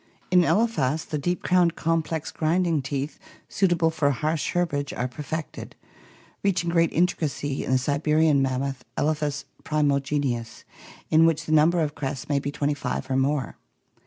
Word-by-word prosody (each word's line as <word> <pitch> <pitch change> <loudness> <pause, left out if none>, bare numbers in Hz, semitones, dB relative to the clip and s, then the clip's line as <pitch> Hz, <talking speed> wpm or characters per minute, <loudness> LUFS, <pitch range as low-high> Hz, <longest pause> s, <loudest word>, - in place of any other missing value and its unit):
In 180 -1 +6
Elephas 165 - +1
the 150 - -3
deep 175 +5 -2
crowned 175 -2 +3
complex 165 -1 -1
grinding 165 -1 +1
teeth 140 +2 -4 0.3
suitable 175 -4 +2
for 155 -3 +1
harsh 150 +4 -1
herbage 145 -5 -1
are 125 - -2
perfected, 150 +5 -6 0.7
reaching 175 -4 0
great 165 -1 +3
intricacy 150 -5 -1
in - - -6
the - - +5
Siberian 150 +2 +2
mammoth, 135 0 -2
Ekphas 150 -2 -1 0.2
primi 145 -2 +1
genius, 135 -5 -3 0.5
in 160 +1 +6
which 165 -2 0
the - - -4
number 160 +3 +4
of 150 -2 -1
crests 135 -3 -4
may 145 -1 +1
be 140 - -4
twenty 145 +1 -1
five 140 -1 -4
or - - +1
more. 135 -1 0
150 Hz, 155 wpm, -25 LUFS, 140-165 Hz, 0.7 s, In